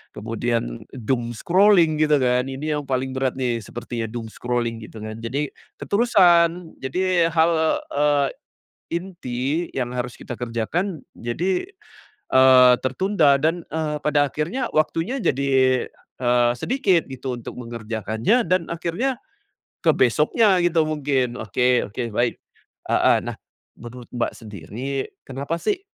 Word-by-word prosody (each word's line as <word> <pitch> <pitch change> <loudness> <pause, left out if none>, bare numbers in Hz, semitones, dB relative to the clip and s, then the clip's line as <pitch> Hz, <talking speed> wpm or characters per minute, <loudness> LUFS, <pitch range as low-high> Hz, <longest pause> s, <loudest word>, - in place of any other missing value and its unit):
kemudian 115 - -3
doom 120 -1 -2
scrolling, 175 - +4
gitu 150 -1 +4
kan. 125 0 +1
Ini 150 +3 -2
yang - - -6
paling 130 0 -1
berat 130 -1 0
nih, 125 -3 -1
sepertinya 115 +1 -5
doom 115 0 -6
scrolling, 120 -1 -2
gitu 110 0 -10
kan, 110 +1 -6
jadi 135 +6 -3 0.3
keterusan. 175 - +3
Jadi 175 +5 +1
hal, 165 +1 +3 0.4
eee, 145 -1 +2 0.6
inti 165 -3 -3
yang 125 -2 -3
harus 125 -1 -4
kita - - -7
kerjakan, 125 - -2
jadi, 175 +11 -1 0.7
eee, 130 -1 +8
tertunda 140 +2 +2
dan, 160 +5 0
eee, 155 -1 -2
pada 145 -1 +2
akhirnya, 175 +13 -2
waktunya 165 - 0
jadi, 130 - +2 0.3
eee, 120 -1 +3
sedikit 195 - +1
gitu, 130 -1 -4
untuk 120 - -8
mengerjakannya, 115 - -1
dan 185 -2 +2
akhirnya, 180 +10 -2 0.6
ke - - +5
besoknya 205 -6 +3
gitu 165 -2 +2
mungkin, 140 -5 0
oke 125 +1 +1
oke, 115 0 -4
baik, 120 +1 0 0.5
heeh. - - +4
Nah, - - -4 0.4
menurut 120 +1 -10
Mbak 120 -1 0
sendiri, 115 +7 -5 0.2
kenapa 140 +5 -4
sih, 385 - -1
135 Hz, 125 wpm, -22 LUFS, 120-170 Hz, 0.7 s, eee